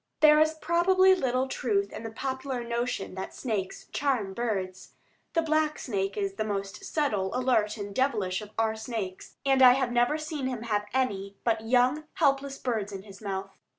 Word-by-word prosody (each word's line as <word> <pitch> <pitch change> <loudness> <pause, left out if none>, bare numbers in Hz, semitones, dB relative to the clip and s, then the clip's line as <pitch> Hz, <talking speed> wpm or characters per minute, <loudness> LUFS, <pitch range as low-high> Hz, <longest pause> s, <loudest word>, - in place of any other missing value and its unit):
There 305 0 +7
is 315 0 +3
probably 370 +4 +4
little 260 -6 0
truth 400 +8 0
in - - -6
the 225 - -5
popular 260 +1 -3
notion 235 -4 -2
that 190 0 -6
snakes 210 -7 -3
charm 250 -9 0
birds. 190 -5 -3 0.4
The 330 - +2
black 310 -1 +1
snake 195 -4 -2
is 200 -1 -1
the 215 - 0
most 200 -2 -4
subtle, 215 -12 0
alert, 235 -4 +1
and 205 -1 -6
devilish 215 -7 0
of 210 - -9
our 220 -1 +1
snakes, 220 -4 -5
and 270 -1 +4
I 250 -1 +10
have 260 -2 0
never 245 +5 +2
seen 305 -3 -3
him 245 -3 -4
have 210 -2 -1
any 200 -6 -1
but 225 -1 0
young, 255 +5 +3
helpless 275 -2 +1
birds 220 -5 -2
in 195 -1 -7
his 195 0 -13
mouth. 195 -1 -5
240 Hz, 180 wpm, -28 LUFS, 205-275 Hz, 0.4 s, I